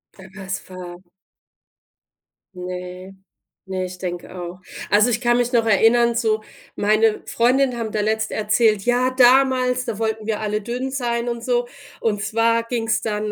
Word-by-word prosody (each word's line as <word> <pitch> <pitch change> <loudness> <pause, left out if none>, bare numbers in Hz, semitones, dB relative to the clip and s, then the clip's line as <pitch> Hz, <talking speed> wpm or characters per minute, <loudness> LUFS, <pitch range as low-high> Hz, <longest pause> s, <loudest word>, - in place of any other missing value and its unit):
Aber 190 -1 -13 0.2
es 190 0 -5
war 180 -1 -8 1.6
Ne, 180 +1 -7 0.5
ne, 190 -1 -3
ich 180 0 -8
denke 175 -1 -6
auch. 175 0 -7 0.3
Also, 210 +4 +4
ich 235 0 -1
kann 240 -1 +3
mich 245 0 0
noch 230 -2 +3
erinnern, 230 +2 +4
so 220 -2 0 0.3
meine 215 +1 +2
Freundinnen 250 +1 +2
haben 225 -2 -3
da 215 - -1
letztens 220 +1 -1
erzählt: 215 -1 +2
„Ja, 245 +1 +2
damals, 255 0 +4
da 225 -3 -4
wollten 220 -1 -2
wir 220 -2 -1
alle 210 0 -2
dünn 245 +4 -4
sein 240 -3 -1
und 235 -1 -4
so.” 245 0 0 0.3
Und 210 -3 -1
zwar 230 +2 +1
ging's 230 -1 -1
dann 210 -1 -2
225 Hz, 160 wpm, -21 LUFS, 205-240 Hz, 1.6 s, Also